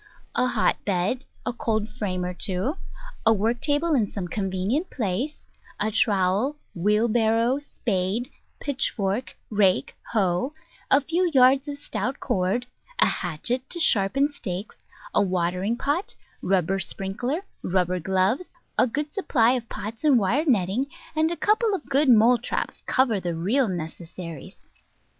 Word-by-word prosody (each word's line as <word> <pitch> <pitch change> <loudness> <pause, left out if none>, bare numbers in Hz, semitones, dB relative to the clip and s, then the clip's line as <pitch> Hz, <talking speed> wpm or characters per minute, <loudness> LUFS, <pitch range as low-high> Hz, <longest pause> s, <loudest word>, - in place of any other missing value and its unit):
A 250 - +2
hotbed, 205 +2 0 0.2
a - - -1
cold 220 -3 -1
frame 205 -5 -3
or 180 - -3
two, 190 +8 -1 0.5
a 225 - +5
work 225 +3 +1
table 305 +3 +2
in 225 -8 +2
some 190 -4 -4
convenient 195 - -1
place, 240 +6 -3 0.3
a 215 +1 +1
trowel, 205 +6 +2 0.2
wheel 210 +6 +2
barrow, 230 +3 +2
spade, 225 -2 -2 0.3
pitchfork, 245 -5 -1
rake, 195 -9 +2 0.2
hoe, 195 +5 +1 0.4
a 275 - +5
few 345 +5 +1
yards 265 +2 +5
of 285 -1 -4
stout 265 -2 -3
cord, 190 +6 0 0.3
a - - +5
hatchet 235 +10 -1
to 345 - -3
sharpen 265 - +3
stakes, 200 -8 -6 0.4
a - - +4
watering 185 +3 0
pot, 290 +9 -1 0.3
rubber 190 0 +1
sprinkler, 240 - -2 0.2
rubber 180 0 0
gloves, 190 - +1 0.3
a - - +5
good 295 +5 -3
supply 245 - +3
of 245 -3 -2
pots 220 +5 -6
and 290 -4 +5
wire 235 - +2
netting, 225 +2 +2 0.3
and 315 +1 +3
a 340 - -2
couple 425 0 +2
of 360 - -6
good 275 +1 +2
mole 235 +1 +6
traps 240 - -3
cover 245 -6 +2
the 175 -2 -3
real 220 +11 +2
necessaries. 170 -2 -7
225 Hz, 140 wpm, -25 LUFS, 190-270 Hz, 0.5 s, mole